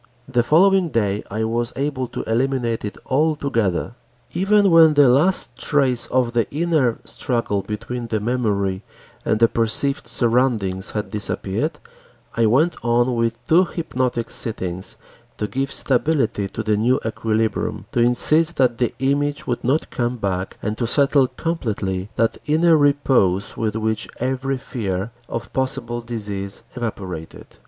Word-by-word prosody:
The 125 -2 +2
following 180 +7 +4
day 105 -5 0
I 110 +2 -2
was 115 +2 -1
able 135 -2 -2
to - - -5
eliminate 120 0 0
it 105 - -5
altogether. 135 - 0 0.4
Even 195 +2 +3
when 160 -2 +7
the 145 -2 +6
last 150 +10 +4
trace 135 -5 +1
of 125 -2 0
the 115 -1 +1
inner 150 -6 +1
struggle 115 -5 -1
between 115 +4 -5
the 110 -1 -1
memory 105 -5 -1 0.4
and 110 - 0
the 115 - +6
perceived 115 +5 0
surroundings 115 -6 +1
had 105 -2 -3
disappeared, 105 +8 -2 0.6
I 115 -1 +3
went 145 +9 +2
on 120 +2 +2
with 115 0 -1
two 170 +3 +5
hypnotic 130 -9 -2
sittings 95 -5 -3 0.4
to 105 - -2
give 135 +6 -2
stability 130 -6 +1
to 110 - -5
the 105 -1 +1
new 120 +5 +2
equilibrium, 110 0 -1
to - - -1
insist 150 +8 +3
that 125 -3 +2
the 120 - 0
image 145 +2 0
would 120 - -2
not 135 +6 0
come 120 0 -1
back 95 -3 -3
and 105 0 -3
to 120 - 0
settle 140 +1 +4
completely 105 - -3
that 115 0 0
inner 160 +2 +4
repose 135 - +2
with 110 -1 -2
which 110 0 -1
every 130 +2 -1
fear 105 -5 -4 0.2
of 115 0 -5
possible 130 -3 -1
disease 105 -4 -5
evaporated. 95 -9 -6
120 Hz, 145 wpm, -21 LUFS, 110-140 Hz, 0.6 s, when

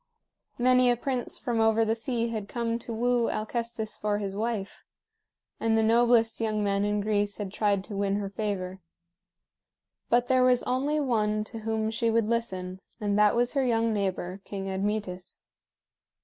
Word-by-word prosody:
Many 255 0 +4
a 240 - +3
prince 255 0 -3
from 240 -4 -2
over 225 0 +4
the 220 - +2
sea 230 0 -2
had 215 -3 -4
come 235 -1 -2
to 235 - -7
woo 240 +1 +1
Alcestis 220 0 -3
for 210 -1 -1
his 200 -2 -4
wife; 215 -2 -3 0.8
and 225 0 +2
the 220 - +3
noblest 230 0 +3
young 215 -2 0
men 200 0 +1
in 205 0 0
Greece 205 -1 0
had 200 -3 -5
tried 200 -2 +1
to 205 - -7
win 200 0 0
her 200 -1 -2
favor. 190 -3 -3 1.3
But 240 +1 +3
there 255 0 +4
was 250 -1 +4
only 275 +4 0
one 215 -6 +1
to 225 +1 -8
whom 220 0 -1
she 230 +1 0
would 225 -1 +2
listen, 190 -6 -2 0.2
and 205 -1 0
that 210 +1 +5
was 240 +1 +1
her 275 -2 +2
young 230 -2 +1
neighbor, 190 -2 -2
King 195 -2 -5
Admetus. 190 -2 -3
220 Hz, 170 wpm, -28 LUFS, 205-235 Hz, 1.3 s, that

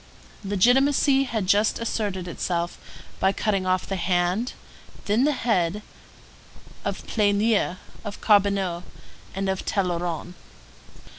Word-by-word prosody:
Legitimacy 265 +7 +3
had 220 -6 -2
just 205 +3 +3
asserted 205 -5 -2
itself 175 0 -2 0.4
by 190 - +3
cutting 195 -2 -1
off 185 0 +1
the 195 - -3
hand, 180 +6 0 0.5
then 220 +6 +2
the 300 - +3
head, 210 - 0 1.0
of - - -4
Pleignier, 205 -2 +2 0.3
of 205 -2 -6
Carbonneau, 200 -4 +2 0.5
and 195 0 -2
of 190 -1 -1
Tolleron. 175 -3 -2
200 Hz, 105 wpm, -25 LUFS, 180-220 Hz, 1.0 s, Legitimacy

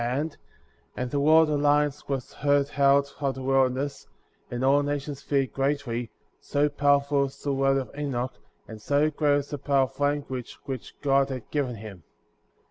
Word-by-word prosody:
and 125 -1 -3
the 145 - 0
roar 155 +3 +6
of - - 0
the 150 - 0
lions 145 0 +2
was 135 -3 -3
heard 145 0 +1
out 140 0 +3
of 140 -2 -1
the 135 - -7
wilder 135 -1 +2
ness; 140 0 -5 0.4
and 120 +2 -2
all 140 +2 +5
nations 145 -1 -3
feared 135 -3 0
greatly, 135 -4 -1 0.3
so 145 +1 +1
powerful 145 -1 +2
was 140 +1 -10
the 140 - 0
word 135 0 +2
of 135 - -4
Enoch, 130 -3 -2 0.3
and 110 -1 -10
so 145 +5 +2
great 145 -1 +2
was 145 0 -2
the 145 - -4
power 140 -1 +2
of 135 0 -5
the - - -10
language 145 -3 -2
which 130 -4 -7
God 140 -1 +3
had 130 -3 -6
given 135 -5 -1
him.'' 100 -4 -10
140 Hz, 185 wpm, -26 LUFS, 130-145 Hz, 0.4 s, roar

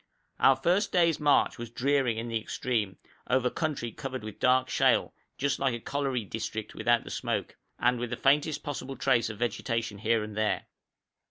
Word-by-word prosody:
Our 135 - +6
first 185 +8 +1
day's 170 -3 +3
march 145 -4 +3
was 120 -1 -6
dreary 130 -1 +1
in 115 +1 -3
the 115 -1 -1
extreme, 110 -5 -2 0.3
over 125 -1 +2
country 145 -7 -2
covered 130 0 -6
with 110 -1 -8
dark 130 0 +3
shale, - - +2 0.2
just 140 +1 0
like 135 -3 +1
a - - -5
colliery 135 -3 -2
district 110 0 -5
without 120 +1 +2
the - - -9
smoke, - - -2 0.2
and 125 0 +2
with 120 0 -3
the 120 - -3
faintest 145 +2 +2
possible 135 -2 -5
trace 120 -5 +2
of 110 - -7
vegetation 115 -2 -2
here 110 +1 +1
and 105 -1 -7
there. 110 -2 0
120 Hz, 180 wpm, -29 LUFS, 115-135 Hz, 0.3 s, Our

